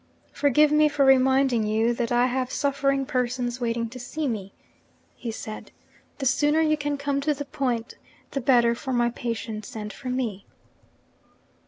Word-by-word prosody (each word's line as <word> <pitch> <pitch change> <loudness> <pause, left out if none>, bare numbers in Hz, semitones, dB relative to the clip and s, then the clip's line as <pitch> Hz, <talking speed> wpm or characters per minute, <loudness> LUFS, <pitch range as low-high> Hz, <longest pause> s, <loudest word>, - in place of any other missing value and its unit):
'Forgive 290 +1 +3
me 300 0 +5
for 285 -1 +2
reminding 265 -3 +4
you 220 +2 +2
that 235 0 -2
I 240 +1 +4
have 255 0 -1
suffering 275 -1 0
persons 250 -1 -2
waiting 230 -1 -1
to 255 +2 -9
see 300 +5 -3
me,' 200 -5 -4 0.6
he 240 - -6
said. 220 -1 -7 0.5
'The 270 - -4
sooner 295 +4 +3
you 310 -1 +3
can 290 -1 -2
come 280 0 -1
to 300 +1 +1
the 285 +1 -5
point, 250 -4 -2 0.4
the 275 - -2
better 240 -2 +4
for 260 +2 -5
my 240 -1 +2
patients 225 -3 -5
and 210 -1 -5
for 255 +5 -7
me.' 235 -6 -3
255 Hz, 165 wpm, -25 LUFS, 235-280 Hz, 0.6 s, me